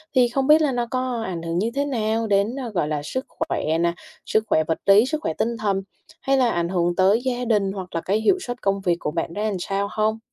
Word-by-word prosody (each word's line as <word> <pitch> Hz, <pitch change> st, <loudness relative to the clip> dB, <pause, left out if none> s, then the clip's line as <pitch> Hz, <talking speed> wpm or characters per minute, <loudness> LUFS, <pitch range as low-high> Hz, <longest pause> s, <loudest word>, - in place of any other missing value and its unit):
thì 250 Hz, -1 st, +5 dB
không 270 Hz, +2 st, -1 dB
biết 310 Hz, +1 st, +7 dB
là 290 Hz, -3 st, +2 dB
nó 240 Hz, -1 st, -1 dB
có 255 Hz, -3 st, -1 dB
ảnh 175 Hz, -4 st, -4 dB
hưởng 165 Hz, +1 st, -3 dB
như 225 Hz, +4 st, 0 dB
thế 280 Hz, +1 st, +1 dB
nào 225 Hz, -4 st, -1 dB
đến, 205 Hz, +4 st, +1 dB
ờ, 255 Hz, -4 st, -4 dB
gọi 175 Hz, -7 st, -1 dB
là 150 Hz, -1 st, -2 dB
sức 260 Hz, -, -4 dB
khỏe 160 Hz, +1 st, -2 dB
nè, 170 Hz, 0 st, +1 dB, 0.3 s
sức 220 Hz, -, +1 dB
khỏe 155 Hz, -, +3 dB
vật 160 Hz, +1 st, -1 dB
lý, 200 Hz, +4 st, +6 dB
sức 310 Hz, +3 st, -2 dB
khỏe 160 Hz, -, -2 dB
tinh 235 Hz, +6 st, -1 dB
thần, 200 Hz, -3 st, -1 dB, 0.4 s
hay 270 Hz, 0 st, +2 dB
là 250 Hz, -2 st, +3 dB
ảnh 170 Hz, -2 st, -1 dB
hưởng 175 Hz, -1 st, 0 dB
tới 195 Hz, +6 st, +4 dB
gia 250 Hz, -1 st, -1 dB
đình 205 Hz, -4 st, +1 dB
hoặc 185 Hz, -3 st, -7 dB
là 165 Hz, -, 0 dB
cái 205 Hz, +3 st, 0 dB
hiệu 370 Hz, -, +3 dB
suất 245 Hz, -7 st, -6 dB
công 195 Hz, 0 st, 0 dB
việc 175 Hz, -3 st, +1 dB
của 150 Hz, -, -3 dB
bạn 165 Hz, +1 st, -3 dB
ra 210 Hz, +1 st, -2 dB
làm 195 Hz, -, -2 dB
sao 195 Hz, +3 st, -1 dB
hông? 215 Hz, +1 st, 0 dB
210 Hz, 265 wpm, -23 LUFS, 180-245 Hz, 0.4 s, biết